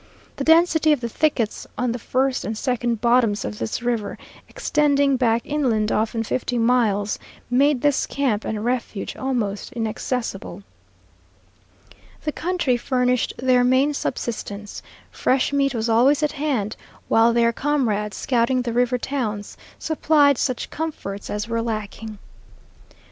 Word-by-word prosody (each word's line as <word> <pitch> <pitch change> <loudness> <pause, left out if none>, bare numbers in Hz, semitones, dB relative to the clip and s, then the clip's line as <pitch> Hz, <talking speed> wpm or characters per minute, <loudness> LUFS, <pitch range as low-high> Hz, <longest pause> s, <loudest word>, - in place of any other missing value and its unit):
The 275 - -2
density 320 0 +4
of 295 - 0
the 235 - -3
thickets 235 -3 -1
on 250 -1 0
the 240 - -4
first 260 +3 0
and 220 0 -4
second 240 -3 -1
bottoms 235 -3 +2
of 105 0 -5
this 110 - -3
river, 235 -4 -1 0.3
extending 285 -2 +2
back 235 -2 +2
inland 240 -8 0
often 225 +1 0
fifty 245 +2 -2
miles, 225 -4 +2 0.3
made 275 +1 +3
this 290 -2 +2
camp 250 -7 0
and 215 0 -3
refuge 240 -4 -2
almost 235 -7 -2
inaccessible. 225 -4 -3 1.6
The 300 - -1
country 330 -7 0
furnished 250 0 0
their 255 -1 +3
main 260 +4 +3
subsistence; 210 -6 -4 0.3
fresh 260 +2 +1
meat 275 -2 +1
was 225 0 -1
always 255 +7 +4
at 300 - +2
hand, 270 -8 -2 0.3
while 225 +1 +4
their 235 0 +3
comrades, 225 -8 0
scouting 250 0 +1
the 235 -1 -3
river 245 +1 +2
towns, 230 -6 -3 0.2
supplied 295 -3 +3
such 255 -3 -2
comforts 245 -11 -5
as 210 +1 -3
were 230 0 -1
lacking. 215 -1 -5
245 Hz, 135 wpm, -22 LUFS, 220-275 Hz, 1.6 s, density